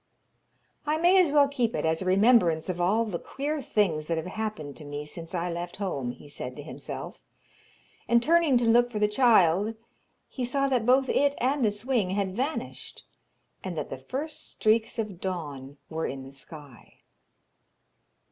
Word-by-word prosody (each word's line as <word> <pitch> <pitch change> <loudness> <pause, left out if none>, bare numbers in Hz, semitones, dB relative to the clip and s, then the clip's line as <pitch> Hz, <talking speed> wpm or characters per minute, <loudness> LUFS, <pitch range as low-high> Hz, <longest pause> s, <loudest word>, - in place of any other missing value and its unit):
'I 305 +1 +2
may 360 +3 +5
as 335 -5 +2
well 290 -1 +5
keep 250 -5 -1
it - - -1
as 160 +1 +1
a - - -3
remembrance 185 -4 +4
of 175 -1 -2
all 210 +6 +2
the 185 -6 -4
queer 290 +2 -3
things 175 - 0
that 165 - 0
have 160 - -3
happened 185 -7 -5
to - - -8
me 145 0 -6
since 165 +3 -6
I 175 0 -1
left 175 +1 -5
home,' 160 -11 -3
he 125 - -9
said 130 -3 -5
to 145 - -8
himself, 155 - -7 0.9
and 235 0 +4
turning 325 -3 +4
to 240 - +1
look 240 +1 +4
for 220 - -4
the 210 0 +3
child, 210 -3 +4 0.5
he 255 - -5
saw 275 +3 +1
that 245 -4 +1
both 260 +1 +4
it 285 +1 +2
and 265 +2 +1
the 215 - +4
swing 210 -1 -1
had 190 -1 -1
vanished, 275 +7 -4 0.6
and 185 -3 -5
that - - -4
the 135 - -4
first 285 - -5
streaks 225 +2 +1
of 210 -6 -4
dawn 145 -7 -5
were 160 0 -3
in 135 0 -6
the 135 - -11
sky. 140 -1 -12
205 Hz, 180 wpm, -27 LUFS, 160-250 Hz, 0.9 s, may